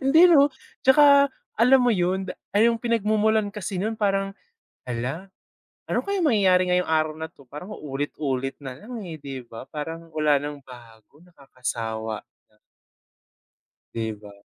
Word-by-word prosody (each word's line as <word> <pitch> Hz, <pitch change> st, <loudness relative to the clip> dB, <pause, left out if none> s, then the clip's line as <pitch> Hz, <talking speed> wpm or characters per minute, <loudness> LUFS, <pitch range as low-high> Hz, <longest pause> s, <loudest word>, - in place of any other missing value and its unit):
hindi 280 Hz, +5 st, +5 dB
'no. 290 Hz, -4 st, +6 dB, 0.4 s
Tsaka 280 Hz, +1 st, +7 dB, 0.3 s
alam 255 Hz, +2 st, +6 dB
mo -, -, +4 dB
yun, 190 Hz, 0 st, 0 dB, 0.3 s
ah, -, -, +5 dB
yung 230 Hz, 0 st, +4 dB
pinagmumulan 220 Hz, -2 st, +1 dB
kasi 195 Hz, -1 st, -5 dB
nun 220 Hz, +2 st, -2 dB
parang, 195 Hz, -2 st, 0 dB, 0.6 s
"Hala, 135 Hz, +11 st, -4 dB, 0.6 s
ano -, -, +1 dB
kaya 400 Hz, -2 st, -1 dB
mangyayari 190 Hz, -, +3 dB
ngayong 180 Hz, -2 st, +1 dB
araw 155 Hz, -1 st, +1 dB
na 160 Hz, 0 st, -5 dB
'to?" 140 Hz, -4 st, -20 dB
Parang 180 Hz, +9 st, -8 dB
ulit-ulit 135 Hz, -2 st, -3 dB
na 130 Hz, -2 st, -7 dB
lang, 230 Hz, -, -8 dB
eh, 160 Hz, -2 st, -7 dB
'di 135 Hz, -3 st, -7 dB
ba, 115 Hz, +1 st, -10 dB
parang 165 Hz, +2 st, -6 dB
wala 150 Hz, -2 st, +3 dB
nang 145 Hz, -1 st, -6 dB
bago 120 Hz, +2 st, -16 dB
nakakasawa 115 Hz, -9 st, -5 dB, 0.3 s
na. 105 Hz, -, -32 dB, 1.4 s
'Di 115 Hz, -1 st, -2 dB
ba? 105 Hz, -1 st, -13 dB
165 Hz, 145 wpm, -24 LUFS, 135-215 Hz, 1.4 s, Tsaka